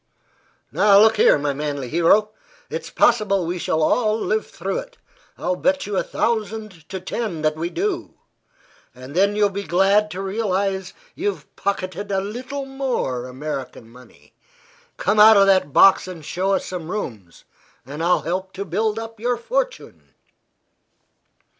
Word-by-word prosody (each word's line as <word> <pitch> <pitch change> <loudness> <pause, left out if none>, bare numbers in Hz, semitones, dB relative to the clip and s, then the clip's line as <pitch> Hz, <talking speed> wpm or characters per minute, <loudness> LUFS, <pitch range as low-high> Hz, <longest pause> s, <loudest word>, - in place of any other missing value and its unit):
Now, 200 -1 +5
look 220 +1 +5
here, - - +5
my 145 0 -1
manly 145 -2 -4
hero. 175 - +3 0.4
It's - - -5
possible 205 -6 +2
we 175 +2 -3
shall 160 -1 0
all 215 +5 +2
live 215 0 -1
through - - -4
it; - - -11 0.4
I'll 180 +1 -1
bet 280 +8 0
you 205 - -4
a - - +2
thousand 215 -7 -3
to 190 - -5
ten 185 -3 -4
that 155 0 +1
we 165 +2 -3
do. 375 - -3 0.8
And 130 +2 -11
then 200 +3 +3
you'll 205 -1 +3
be 200 +1 -4
glad 200 +3 +2
to 185 0 -5
realize 195 -2 -2 0.2
you've 405 +4 -4
pocketed 200 0 -3
a 195 - +1
little 250 +8 -5
more 255 - -3
American 130 -3 -6
money. 120 - -18 0.6
Come 210 +2 +1
out 215 0 +9
of 195 - +6
that 185 -7 +3
box 190 +5 +5
and 170 -5 -9
show 190 +5 -1
us - - 0
some 175 -3 -6
rooms, 110 - -6 0.4
and 145 +4 -7
I'll 175 +2 +2
help 185 +2 -3
to 200 +1 -5
build 210 +5 -1
up 225 -1 -7
your 245 +2 0
fortune." - - -4
195 Hz, 155 wpm, -21 LUFS, 165-220 Hz, 0.8 s, out